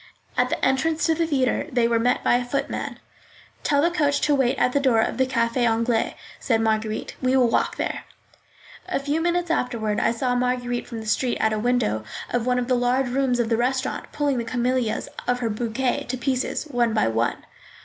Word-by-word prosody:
At -, -, +2 dB
the -, -, -1 dB
entrance 305 Hz, +5 st, +1 dB
to 325 Hz, -, +3 dB
the 330 Hz, +1 st, 0 dB
theatre 280 Hz, -1 st, 0 dB
they 240 Hz, -2 st, +2 dB
were 230 Hz, -1 st, +2 dB
met 245 Hz, +2 st, +1 dB
by -, -, +3 dB
a 250 Hz, -, -2 dB
footman. 260 Hz, +3 st, -3 dB, 0.6 s
"Tell 285 Hz, 0 st, +2 dB
the 340 Hz, -, +3 dB
coachman 290 Hz, -4 st, +1 dB
to 295 Hz, -, +3 dB
wait 265 Hz, -3 st, +2 dB
at -, -, +2 dB
the 280 Hz, -, +3 dB
door 260 Hz, -5 st, +3 dB
of 225 Hz, -, 0 dB
the 260 Hz, -, +3 dB
Café 235 Hz, -2 st, 0 dB
Anglais," 230 Hz, 0 st, 0 dB, 0.2 s
said 230 Hz, -4 st, +1 dB
Marguerite. 220 Hz, -1 st, -1 dB
"We 255 Hz, 0 st, +2 dB
will 245 Hz, -2 st, +4 dB
walk -, -, +1 dB
there." -, -, -3 dB, 0.8 s
A -, -, 0 dB
few 290 Hz, +3 st, -1 dB
minutes 345 Hz, 0 st, 0 dB
afterward 230 Hz, -8 st, -1 dB
I -, -, +2 dB
saw 245 Hz, +2 st, 0 dB
Marguerite 245 Hz, -1 st, -1 dB
from 230 Hz, -2 st, -6 dB
the -, -, -9 dB
street 240 Hz, +3 st, 0 dB
at 220 Hz, 0 st, +1 dB
a 215 Hz, -, -1 dB
window 220 Hz, -, +1 dB, 0.3 s
of 245 Hz, 0 st, -1 dB
one 250 Hz, 0 st, +2 dB
of 245 Hz, -1 st, -1 dB
the 255 Hz, -, +2 dB
large 250 Hz, +1 st, +1 dB
rooms 255 Hz, -1 st, +1 dB
of 230 Hz, -2 st, +1 dB
the 225 Hz, -, +2 dB
restaurant, 260 Hz, +2 st, -1 dB
pulling 285 Hz, -4 st, 0 dB
the -, -, -1 dB
camellias 240 Hz, -1 st, -1 dB, 0.2 s
of 245 Hz, -, +2 dB
her 235 Hz, -3 st, -2 dB
bouquet 235 Hz, +3 st, -1 dB
to 255 Hz, -, -2 dB
pieces, 255 Hz, +1 st, -1 dB
one 240 Hz, -6 st, 0 dB
by 215 Hz, -, +3 dB
one. 115 Hz, +2 st, -1 dB
245 Hz, 210 wpm, -24 LUFS, 230-265 Hz, 0.8 s, will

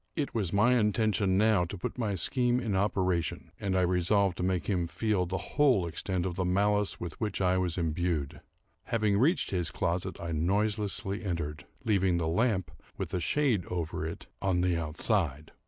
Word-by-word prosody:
It 145 Hz, -4 st, -2 dB
was 100 Hz, -7 st, -1 dB
my 120 Hz, +5 st, +4 dB
intention, 105 Hz, -3 st, +2 dB
now, 105 Hz, -3 st, +4 dB
to 95 Hz, +4 st, -6 dB
put 90 Hz, -, -5 dB
my 105 Hz, -4 st, 0 dB
scheme 125 Hz, +6 st, +1 dB
in 110 Hz, -6 st, -1 dB
operation, 95 Hz, -3 st, 0 dB
and 95 Hz, -2 st, 0 dB
I -, -, +3 dB
resolved 90 Hz, +2 st, +2 dB
to -, -, -2 dB
make 90 Hz, -1 st, 0 dB
him 90 Hz, -4 st, 0 dB
feel 100 Hz, -1 st, 0 dB
the 95 Hz, +2 st, -2 dB, 0.2 s
whole 130 Hz, -, +4 dB
extent 90 Hz, +2 st, -2 dB
of 90 Hz, -, -2 dB
the 95 Hz, +1 st, -2 dB
malice 100 Hz, +3 st, +1 dB
with 85 Hz, +3 st, -7 dB
which 105 Hz, -3 st, -2 dB
I 95 Hz, -1 st, +2 dB
was 90 Hz, -2 st, -1 dB
imbued. 80 Hz, -3 st, -1 dB, 0.4 s
Having 105 Hz, -3 st, +1 dB
reached 155 Hz, +9 st, +2 dB
his 90 Hz, -3 st, 0 dB
closet, 90 Hz, 0 st, -2 dB
I 85 Hz, -1 st, -4 dB
noiselessly 100 Hz, +4 st, 0 dB
entered, 75 Hz, -6 st, -4 dB, 0.2 s
leaving 95 Hz, -5 st, +2 dB
the 85 Hz, -2 st, -1 dB
lamp, 95 Hz, -2 st, +1 dB, 0.3 s
with -, -, -4 dB
a 90 Hz, -, +1 dB
shade 125 Hz, -, +1 dB
over 85 Hz, -3 st, -3 dB
it, 80 Hz, +1 st, -5 dB, 0.2 s
on 95 Hz, -2 st, +1 dB
the 90 Hz, -1 st, +2 dB
outside. 80 Hz, -, -1 dB
95 Hz, 180 wpm, -30 LUFS, 85-105 Hz, 0.4 s, my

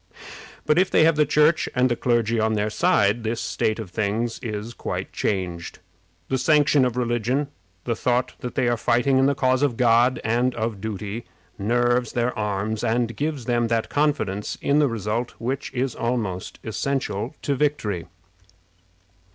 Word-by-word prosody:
But 150 Hz, -, +3 dB
if 185 Hz, -, +3 dB
they -, -, +4 dB
have 165 Hz, -1 st, +4 dB
the 150 Hz, -1 st, +3 dB
Church 150 Hz, +2 st, +3 dB
and 125 Hz, +1 st, +4 dB
the 120 Hz, -, 0 dB
clergy 115 Hz, -2 st, +1 dB
on 110 Hz, 0 st, +1 dB
their 105 Hz, 0 st, 0 dB
side, 105 Hz, +1 st, +2 dB
this 115 Hz, +1 st, -2 dB
state 90 Hz, +5 st, -1 dB
of 110 Hz, -6 st, -7 dB
things 110 Hz, +3 st, -1 dB
is 110 Hz, -1 st, -5 dB
quite -, -, -5 dB
changed. 90 Hz, -4 st, -2 dB, 0.5 s
The 130 Hz, -, 0 dB
sanction 145 Hz, -1 st, +4 dB
of 125 Hz, -1 st, -2 dB
religion 125 Hz, +4 st, 0 dB, 0.3 s
the 115 Hz, -, -1 dB
thought 125 Hz, +2 st, 0 dB
that 125 Hz, -, -6 dB
they 125 Hz, -, +1 dB
are 120 Hz, 0 st, +1 dB
fighting 125 Hz, +4 st, +2 dB
in 135 Hz, -, +4 dB
the 140 Hz, -, +2 dB
cause 130 Hz, -1 st, +2 dB
of 140 Hz, -6 st, +1 dB
God 120 Hz, +1 st, +4 dB
and 120 Hz, +3 st, +1 dB
of 110 Hz, -3 st, -3 dB
duty, 105 Hz, +1 st, -5 dB, 0.3 s
nerves 120 Hz, +3 st, +1 dB
their 120 Hz, +1 st, 0 dB
arms, 105 Hz, +1 st, -2 dB
and 115 Hz, 0 st, 0 dB
gives 145 Hz, -3 st, -3 dB
them 120 Hz, -1 st, +1 dB
that 115 Hz, -1 st, 0 dB
confidence 135 Hz, -10 st, -1 dB
in 145 Hz, +1 st, +2 dB
the 150 Hz, -, +4 dB
result 115 Hz, +2 st, -3 dB
which 130 Hz, +4 st, -3 dB
is 130 Hz, 0 st, -1 dB
almost 110 Hz, -7 st, -3 dB
essential 120 Hz, 0 st, -2 dB
to 145 Hz, -, +1 dB
victory. 130 Hz, -, -1 dB
120 Hz, 165 wpm, -23 LUFS, 110-130 Hz, 0.5 s, they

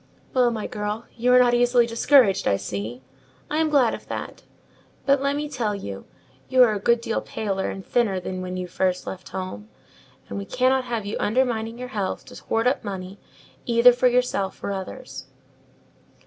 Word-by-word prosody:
"Well, 250 Hz, -2 st, +4 dB
my 225 Hz, -3 st, -3 dB
girl, 210 Hz, +2 st, -4 dB
you 245 Hz, +1 st, +2 dB
are 250 Hz, -, +7 dB
not 245 Hz, -1 st, +5 dB
easily 245 Hz, 0 st, +4 dB
discouraged, 230 Hz, -4 st, +4 dB
I 100 Hz, -, +3 dB
see: 110 Hz, +6 st, -5 dB, 0.5 s
I 300 Hz, -, 0 dB
am 320 Hz, -1 st, +2 dB
glad 275 Hz, -6 st, +3 dB
of -, -, -8 dB
that. -, -, -6 dB, 0.6 s
But, 275 Hz, -1 st, +3 dB
let 280 Hz, +1 st, +1 dB
me 295 Hz, +1 st, -2 dB
tell 230 Hz, -7 st, -2 dB
you, 100 Hz, -, -7 dB, 0.4 s
you 255 Hz, -1 st, +6 dB
are 225 Hz, -3 st, +4 dB
a 205 Hz, -, -2 dB
good 235 Hz, +3 st, +2 dB
deal 225 Hz, -1 st, -1 dB
paler 195 Hz, -3 st, -3 dB
and 195 Hz, -, -7 dB
thinner 215 Hz, -6 st, +1 dB
than 185 Hz, 0 st, -5 dB
when 185 Hz, 0 st, -4 dB
you 180 Hz, -, -3 dB
first 185 Hz, +1 st, -1 dB
left 185 Hz, -1 st, -7 dB
home; 110 Hz, -, -6 dB, 0.6 s
and 100 Hz, -, -5 dB
we 100 Hz, -, -5 dB
cannot 255 Hz, -, +1 dB
have 230 Hz, -4 st, -3 dB
you 205 Hz, -, -3 dB
undermining 230 Hz, -1 st, 0 dB
your 250 Hz, 0 st, -6 dB
health 205 Hz, -6 st, -3 dB
to -, -, -12 dB
hoard 225 Hz, +1 st, 0 dB
up 255 Hz, +2 st, +1 dB
money 190 Hz, -1 st, -6 dB, 0.5 s
either 240 Hz, +1 st, +6 dB
for 250 Hz, +1 st, +3 dB
yourself 245 Hz, -6 st, 0 dB
or -, -, -2 dB
others." 200 Hz, +7 st, -6 dB
225 Hz, 190 wpm, -24 LUFS, 190-250 Hz, 0.6 s, are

